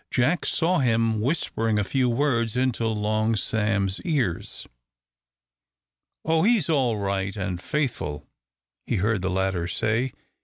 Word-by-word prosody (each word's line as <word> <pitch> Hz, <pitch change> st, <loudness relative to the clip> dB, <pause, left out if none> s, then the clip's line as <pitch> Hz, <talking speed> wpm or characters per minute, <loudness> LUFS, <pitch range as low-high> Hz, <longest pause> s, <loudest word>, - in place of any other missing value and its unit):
Jack 135 Hz, +8 st, +1 dB
saw 175 Hz, +2 st, +2 dB
him 115 Hz, -4 st, +2 dB
whispering 115 Hz, -5 st, 0 dB
a 105 Hz, -, +2 dB
few 125 Hz, +4 st, +1 dB
words 120 Hz, -3 st, +1 dB
into 125 Hz, -3 st, +1 dB
Long 110 Hz, +1 st, 0 dB
Sam's 100 Hz, -2 st, 0 dB
ears. 135 Hz, -, -2 dB, 1.6 s
"Oh, 160 Hz, 0 st, +3 dB
he's 215 Hz, -4 st, +3 dB
all 130 Hz, -7 st, +2 dB
right 100 Hz, -1 st, -2 dB
and 90 Hz, -3 st, -3 dB
faithful!" 120 Hz, -, -2 dB, 0.6 s
he -, -, 0 dB
heard 105 Hz, +1 st, +1 dB
the 95 Hz, -, -1 dB
latter 95 Hz, -2 st, 0 dB
say. 115 Hz, +7 st, 0 dB
115 Hz, 125 wpm, -25 LUFS, 100-130 Hz, 1.6 s, Oh